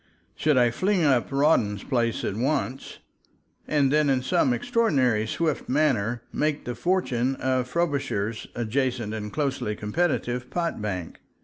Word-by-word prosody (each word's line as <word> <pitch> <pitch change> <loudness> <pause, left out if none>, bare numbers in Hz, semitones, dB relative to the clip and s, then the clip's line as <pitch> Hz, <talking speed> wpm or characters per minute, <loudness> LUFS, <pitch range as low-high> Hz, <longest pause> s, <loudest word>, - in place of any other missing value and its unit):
Should 150 -3 +1
I 120 -1 +4
fling 185 - +1
up 135 -4 +2
Rawdon's 135 -8 +2
place 120 -4 0
at 100 - -2
once 135 +2 -2 0.7
and 145 -3 +2
then 150 -1 +3
in 130 -2 +1
some 130 0 +2
extraordinary, 125 - +1
swift 155 +5 -2
manner 125 -5 +1
make 150 -1 -1
the 125 - -3
fortune 130 -3 0
of 130 -1 0
Frobisher's 140 -9 -1
adjacent 120 -1 -1
and 105 -1 -5
closely 135 -7 -1
competitive 125 +1 -1
pot 170 -9 -2
bank? 95 -5 -4
130 Hz, 135 wpm, -25 LUFS, 115-150 Hz, 0.7 s, I